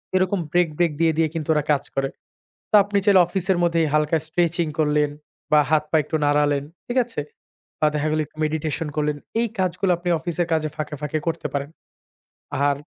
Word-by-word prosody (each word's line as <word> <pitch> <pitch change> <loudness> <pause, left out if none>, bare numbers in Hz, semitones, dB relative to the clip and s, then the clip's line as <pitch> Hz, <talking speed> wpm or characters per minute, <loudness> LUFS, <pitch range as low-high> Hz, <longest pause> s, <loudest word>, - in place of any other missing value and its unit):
এরকম 185 +1 +2
break, 175 -1 +3
break 175 -2 +2
দিয়ে 165 -1 +4
দিয়ে 165 -1 +3
কিন্তু 160 -2 -4
ওরা 150 -1 +1
কাজ 140 -1 +2
করে। 135 0 0 0.6
তো - - -8
আপনি 205 0 0
চাইলে 200 -3 +6
অফিসের 185 0 0
মধ্যেই 170 -2 +2
হালকা 150 +1 +2
স্ট্রেচিং 170 +1 +1
করলেন 150 -1 +2 0.4
বা, 150 - +7
হাত 155 -1 +4
পা 160 - +3
একটু 155 +2 -2
নাড়ালেন। 145 -1 +2 0.2
ঠিক 245 - -4
আছে? 230 -10 -5 0.6
বা, 155 - +4
দেখা 150 +1 0
গেলো 155 0 +1
একটু 155 - -32
মেডিটেশন 155 +1 -2
করলেন। 150 -1 0 0.2
এই 235 - +1
কাজগুলো 185 0 0
আপনি 175 +1 -4
অফিসের 170 +1 -2
কাজে 155 -1 +1
ফাঁকে, 155 -1 -4
ফাঁকে 150 +1 -2
করতে 165 -2 -1
পারেন। 140 +1 -2 1.0
আর 140 - +1
160 Hz, 185 wpm, -23 LUFS, 150-175 Hz, 1.0 s, বা